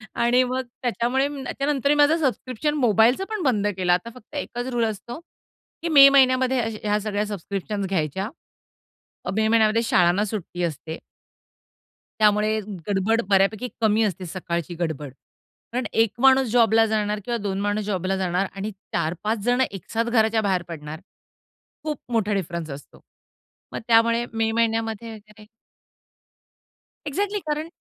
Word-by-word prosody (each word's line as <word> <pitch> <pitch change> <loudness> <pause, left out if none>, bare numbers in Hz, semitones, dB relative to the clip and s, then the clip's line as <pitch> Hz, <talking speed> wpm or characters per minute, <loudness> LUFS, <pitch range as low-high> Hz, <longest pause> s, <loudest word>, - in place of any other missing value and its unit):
आणि 245 +2 +3
मग 255 +1 -1 0.2
त्याच्यामुळे 250 +2 0 0.2
त्याच्यानंतरही 280 +1 0
माझं 295 +3 +4
सबस्क्रिप्शन 270 0 -1
मोबाईलचं 240 - +3
पण 430 -5 -3
बंद 210 -7 +1
केलं. 180 -1 +2
आता 180 +6 -1
फक्त 255 +4 -15
एकच 245 -3 -4
रुळ 235 -1 +1
असतो, 225 +5 -5 0.6
की 335 - -2
मे 280 -3 +9
महिन्यामध्ये 260 -1 +4
अ, 225 - 0 0.2
ह्या 210 0 +1
सगळ्या 210 0 -2
सबस्क्रिप्शन्स 200 0 -4
घ्यायच्या. 190 +3 -2 1.0
अ, - - -2
मे 220 +1 +2
महिन्यामध्ये 225 0 +3
शाळांना 180 -2 +3
सुट्टी 190 -4 -5
असते. 160 0 -5 1.2
त्यामुळे 215 +1 +3 0.3
गडबड 205 +3 +1
बऱ्यापैकी 200 +5 +2
कमी 220 0 +3
असते, 190 -3 -2
सकाळची 170 -1 -4
गडबड. 150 -5 -3 0.6
कारण 245 0 -2
1 225 -2 +3
माणूस 265 -1 +5
जॉबला 225 -2 +4
जाणार 210 -1 -1
किंवा 240 -1 -1
2 195 -1 -2
माणूस 205 +1 -1
जॉबला 190 -1 -1
जाणार 185 +1 0
आणि 200 +2 -4 0.2
4-5 175 +7 -1
जण 245 +1 +2
एकसाथ 225 +4 -3
घराच्या 220 -1 +3
बाहेर 190 -3 +1
पडणार. 155 -2 -7 0.8
खूप 305 -2 -3
मोठा 215 -3 +1
डिफरन्स 170 -4 -3
असतो. 140 +1 -11 0.7
मग - - -3
त्यामुळे 230 +1 +4
मे 225 0 0
महिन्यामध्ये 225 0 -1
वगैरे 210 0 -15 1.6
एक्झॅक्टली 405 +7 -1
कारण 300 +1 -2
220 Hz, 140 wpm, -23 LUFS, 195-245 Hz, 1.6 s, मे